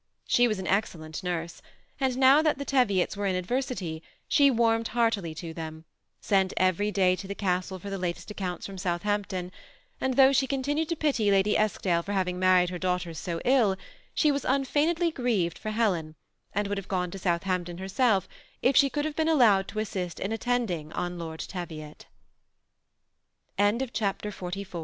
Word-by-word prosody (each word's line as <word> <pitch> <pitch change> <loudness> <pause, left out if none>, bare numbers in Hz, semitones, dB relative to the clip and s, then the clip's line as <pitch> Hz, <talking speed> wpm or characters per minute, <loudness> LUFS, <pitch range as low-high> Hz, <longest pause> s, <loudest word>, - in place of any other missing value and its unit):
She 245 0 +4
was 215 -3 -1
an 190 - -5
excellent 165 -6 -2
nurse; 170 -2 -4 0.4
and 260 -2 0
now 270 +3 +6
that 310 -2 +1
the 280 - -5
Teviots 210 -11 +2
were 200 0 -1
in 190 - 0
adversity, 185 -5 -2 0.3
she 285 -1 +5
warmed 230 -2 +2
heartily 220 -8 0
to 165 0 -6
them; 160 0 -7 0.3
sent 195 -2 +1
every 185 +3 +2
day 185 -3 +3
to 190 +1 -8
the 200 - -5
castle 185 -1 -1
for 200 +2 -8
the 195 - -3
latest 180 +3 -4
accounts 185 -4 -4
from 195 -1 -7
Southampton; 185 0 -2 0.5
and 260 -1 0
though 270 +1 +6
she 270 0 +2
continued 290 +4 -1
to 335 - 0
pity 275 -9 +1
Lady 200 +1 +3
Eskdale 190 -5 +1
for 200 +4 -5
having 180 -2 -1
married 185 -1 +4
her 180 - -5
daughters 180 -3 -2
so 170 -2 -3
ill, 240 -7 +4 0.4
she 300 - +4
was 280 -1 -1
unfeignedly 300 +6 +1
grieved 220 - -1
for 215 - -4
Helen, 185 -9 0 0.4
and 205 0 -1
would 200 0 -2
have 195 - -10
gone 180 -2 -1
to 195 - -7
Southampton 175 -1 -1
herself 195 +1 +1 0.4
if 260 +1 +3
she 280 - +6
could 295 +2 -2
ha^« 310 -1 -3
been 320 0 +1
allowed 220 -11 +4
to 215 - -9
assist 185 -5 -3
in 195 - -3
attending 225 -10 -1
200 Hz, 165 wpm, -27 LUFS, 180-250 Hz, 0.5 s, now